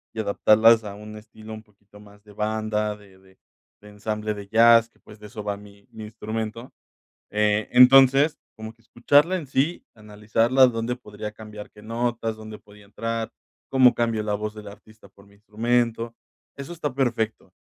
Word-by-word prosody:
y - - -5
adaptarlas 110 +2 +4
a 100 -1 -7
un 105 +1 -10
estilo 110 0 -12
un 110 - -9
poquito 105 -1 -22
más 105 0 -18
de 105 - -17
banda, 105 0 -2
de 100 -2 -19
de 95 0 -24 0.4
de 105 - -14
ensamble 105 +1 -4
de 100 -1 -10
jazz, 115 +1 +5
que, - - -34
pues, 105 0 -16
de 105 - -11
eso 105 -1 -9
va 100 -1 -3
mi 100 0 -17
mi 110 -1 -9
instrumento. 110 +2 -6 0.6
Entonces, 125 +7 +5 0.2
como 110 0 -8
que 115 - -34
escucharla 145 +10 +2
en 160 -6 -6
sí, 140 +6 -1
analizarla, 110 +4 +2
¿dónde 115 +1 -3
podría 105 -2 -9
cambiar 105 -1 -11
qué 105 - -17
notas? 115 0 -3
¿Dónde 110 -1 -10
podía 105 0 -19
entrar? 115 +2 -4 0.4
¿Cómo 130 -2 +5
cambio 115 -2 -1
la 105 -1 -3
voz 105 +1 -4
de 105 - -10
la 100 -1 -10
artista 110 +1 -19
por 100 0 -21
mi 100 - -22
instrumento? 115 +2 -1 0.4
Eso 140 +4 -8
está 150 -6 -5
perfecto. 115 -4 -2
110 Hz, 175 wpm, -23 LUFS, 105-115 Hz, 0.6 s, jazz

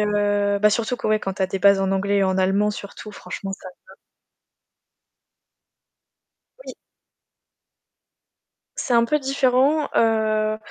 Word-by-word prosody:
heu 205 -1 0
bah 210 - +5
surtout 235 +3 -1
que - - -5
ouais, 215 0 +1
quand 195 -1 -4
tu 195 - -3
as - - +2
des 190 +1 -4
bases 200 +1 +4
en 195 - 0
anglais 200 +1 0
et - - +2
en 190 0 0
allemand 195 +3 +1
surtout, 210 +1 -9
franchement 195 +1 -7
ça 190 -1 -10 0.2
va. - - -15 2.7
Oui. - - -8 2.0
C'est 250 - -2
un 235 0 +4
peu 300 +5 0
différent 270 +2 +1
heu, 215 -1 +1
210 Hz, 140 wpm, -22 LUFS, 195-230 Hz, 2.7 s, bah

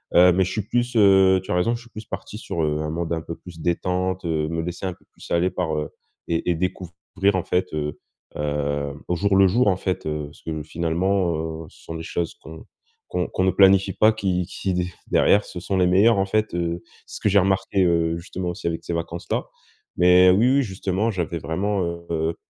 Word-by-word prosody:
heu, 90 +1 +8
mais 95 +2 +3
je 90 - -4
suis 110 - -2
plus, 120 +1 -1
heu, 95 -3 +6
tu - - -6
as - - +1
raison, 115 +7 +2
je 120 - -8
suis 120 - -16
plus 110 0 -9
parti 105 - -7
sur, 85 -6 -4
heu, 75 0 0
un 75 - -3
mode 85 0 -2
un 80 - -2
peu 85 0 -7
plus 85 -2 -13
détente, 90 +2 -1
heu, 80 -2 0
me 80 0 -2
laisser 90 +3 -5
un 90 - -2
peu - - -25
plus - - -13
aller 85 +2 +2
par, 80 - -2
heu, 75 -1 -3 0.4
et 85 +1 -1
et 85 - +1
découvrir 90 +2 -2
en 90 - 0
fait, 90 0 -1
heu 75 -1 -3 0.4
heu, 75 -1 -2
au 90 - 0
jour 100 +2 +1
le 95 0 +6
jour 115 +5 +2
en 95 - +3
fait, 95 -3 -3
heu, 75 -1 -3
ce - - -19
que 80 -2 -4
finalement, 85 +3 0 0.3
heu, - - -15
ce - - -20
sont 80 - -7
des 80 - -6
choses 85 0 -3
qu'on 80 0 -11 0.4
qu'on - - -1
qu'on 95 - -1
ne 95 - +3
planifie 95 +1 +5
pas, 110 +1 +5
qui 95 -4 -1
qui 95 -1 -3
d 90 0 0 0.2
derrière 105 0 +4
ce 90 - -7
sont 95 0 -1
les 90 -1 +3
meilleures 100 +4 +5
en 95 - +2
fait, 110 0 0
heu, 85 0 -2 0.2
c'est - - -11
ce - - -10
que 105 - +2
j'ai 100 - +5
remarqué, 95 0 +1
heu, 85 -1 +1
justement 90 +1 -5
aussi 85 -1 -5
avec 85 -1 -3
ces - - -5
vacances 85 +1 -4
là. - - 0 0.5
Mais 90 +1 +6
oui, 120 +8 +4
oui, 140 - +4
justement 95 0 -1
j'avais 85 -3 -3
vraiment, 95 +5 -1 0.3
heu, 80 0 -1
90 Hz, 235 wpm, -23 LUFS, 85-95 Hz, 0.5 s, heu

